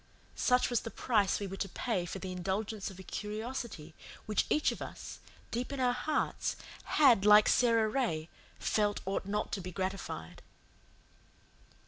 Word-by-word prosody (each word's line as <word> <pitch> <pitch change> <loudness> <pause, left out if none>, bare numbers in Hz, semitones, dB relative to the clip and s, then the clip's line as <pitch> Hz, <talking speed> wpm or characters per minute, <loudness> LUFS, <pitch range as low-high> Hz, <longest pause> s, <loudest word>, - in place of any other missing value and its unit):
Such 250 0 +3
was 240 - +3
the 225 - -6
price 210 -5 +1
we 205 - -3
were 195 0 -6
to 195 - -2
pay 190 -3 -2
for 190 - -5
the 190 -1 -5
indulgence 195 +3 -2
of 190 - -11
a 190 - -9
curiosity 215 -6 -5 0.3
which 215 - +1
each 300 - +3
of - - -7
us, - - -7 0.3
deep 245 +3 -2
in 280 - -4
our 250 -1 +3
hearts, 300 +5 -1 0.3
had, 255 -10 +5
like 210 0 +8
Sara 230 -3 +4
Ray, 215 -11 -1 0.3
felt 210 -1 +1
ought 195 0 -2
not 210 +1 -1
to 195 - -2
be 180 0 -6
gratified. 185 - -4
210 Hz, 160 wpm, -32 LUFS, 190-240 Hz, 0.3 s, like